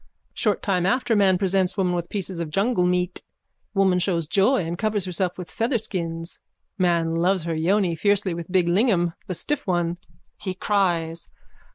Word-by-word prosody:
Short 210 Hz, -3 st, 0 dB
time 185 Hz, -3 st, +1 dB
after 245 Hz, 0 st, +1 dB
man 195 Hz, -3 st, +4 dB
presents 190 Hz, 0 st, +1 dB
woman 180 Hz, -2 st, +1 dB
with 175 Hz, -1 st, -3 dB
pieces 190 Hz, -3 st, -4 dB
of 165 Hz, -2 st, -3 dB
jungle 195 Hz, +2 st, +1 dB
meat. 180 Hz, 0 st, 0 dB, 0.5 s
Woman 190 Hz, -2 st, +3 dB
shows 175 Hz, -3 st, 0 dB
joy 195 Hz, -, +2 dB
and 165 Hz, +1 st, -3 dB
covers 210 Hz, 0 st, -1 dB
herself 180 Hz, 0 st, -2 dB
with 180 Hz, -2 st, -6 dB
featherskins. 185 Hz, -8 st, -2 dB, 0.4 s
Man 170 Hz, -4 st, +1 dB
loves 180 Hz, +2 st, +1 dB
her 165 Hz, 0 st, -2 dB
yoni 175 Hz, +2 st, +1 dB
fiercely 200 Hz, +1 st, +1 dB
with 170 Hz, +1 st, -7 dB
big 180 Hz, -2 st, +3 dB
lingam, 175 Hz, -3 st, +2 dB
the 185 Hz, -, -3 dB
stiff 295 Hz, -, -3 dB
one. 175 Hz, -1 st, 0 dB, 0.4 s
_(He 185 Hz, -2 st, -4 dB
cries.) 170 Hz, -5 st, 0 dB
185 Hz, 165 wpm, -24 LUFS, 170-200 Hz, 0.5 s, man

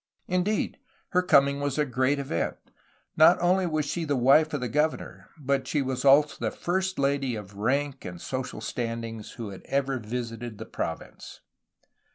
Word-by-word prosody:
Indeed, 185 Hz, +4 st, 0 dB, 0.3 s
her 180 Hz, -, +3 dB
coming 140 Hz, -5 st, +4 dB
was 145 Hz, -1 st, -2 dB
a 150 Hz, -, +2 dB
great 130 Hz, +2 st, +1 dB
event. 135 Hz, -12 st, -2 dB, 0.6 s
Not 160 Hz, +3 st, +7 dB
only 180 Hz, +1 st, +2 dB
was 155 Hz, -2 st, 0 dB
she 170 Hz, +4 st, -2 dB
the 145 Hz, -3 st, 0 dB
wife 140 Hz, +5 st, +5 dB
of 145 Hz, -, -2 dB
the 125 Hz, -, -2 dB
governor, 150 Hz, +6 st, -2 dB
but 140 Hz, -2 st, -1 dB
she 145 Hz, -3 st, 0 dB
was 130 Hz, -1 st, -3 dB
also 145 Hz, +2 st, +5 dB
the -, -, 0 dB
first 185 Hz, +1 st, -2 dB
lady 140 Hz, -3 st, +1 dB
of 105 Hz, -2 st, -8 dB
rank 135 Hz, +7 st, -1 dB
and 90 Hz, -1 st, -7 dB
social 130 Hz, +3 st, -4 dB
standing 115 Hz, -2 st, -4 dB
who 115 Hz, -3 st, -5 dB
had 95 Hz, -, -10 dB
ever 135 Hz, -1 st, 0 dB
visited 115 Hz, 0 st, -5 dB
the -, -, -7 dB
province. -, -, -6 dB
140 Hz, 170 wpm, -27 LUFS, 120-150 Hz, 0.6 s, Not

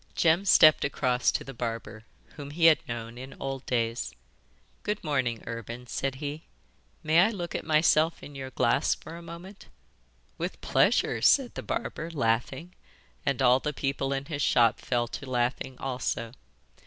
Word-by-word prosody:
Jem 170 Hz, +4 st, +3 dB
stepped 155 Hz, -4 st, +7 dB
across 125 Hz, -3 st, +1 dB
to -, -, -2 dB
the 135 Hz, -, -9 dB
barber, 115 Hz, -2 st, -5 dB, 0.3 s
whom 145 Hz, -2 st, -8 dB
he 165 Hz, +3 st, +1 dB
had 160 Hz, -2 st, +7 dB
known 120 Hz, 0 st, -6 dB
in 130 Hz, +1 st, -9 dB
old 135 Hz, -1 st, -4 dB
days. 115 Hz, -1 st, -1 dB, 0.7 s
'Good 210 Hz, 0 st, -3 dB
morning, 130 Hz, -7 st, -1 dB
Urban,' 115 Hz, +1 st, -6 dB
said 135 Hz, +3 st, -3 dB
he; 145 Hz, +2 st, -5 dB, 0.6 s
'may 160 Hz, +2 st, +4 dB
I 195 Hz, +5 st, +6 dB
look 180 Hz, -6 st, -5 dB
at -, -, -3 dB
myself 155 Hz, +1 st, +3 dB
in 145 Hz, -, -10 dB
your 135 Hz, -1 st, -6 dB
glass 125 Hz, +3 st, +2 dB
for 160 Hz, -, -11 dB
a 170 Hz, -, -9 dB
moment?' 170 Hz, +4 st, -11 dB, 0.7 s
'With -, -, -4 dB
pleasure,' -, -, +2 dB
said -, -, +4 dB
the -, -, -5 dB
barber, 165 Hz, -, -4 dB
laughing, 130 Hz, +4 st, -1 dB, 0.5 s
and 135 Hz, -1 st, +1 dB
all 125 Hz, +1 st, +5 dB
the 150 Hz, +2 st, -3 dB
people 135 Hz, 0 st, -2 dB
in 135 Hz, 0 st, -2 dB
his 145 Hz, -2 st, -4 dB
shop 120 Hz, -4 st, +3 dB
fell 120 Hz, -1 st, -1 dB
to 140 Hz, -, -7 dB
laughing 125 Hz, +1 st, -1 dB
also. 125 Hz, -3 st, -3 dB
135 Hz, 165 wpm, -28 LUFS, 120-155 Hz, 0.7 s, stepped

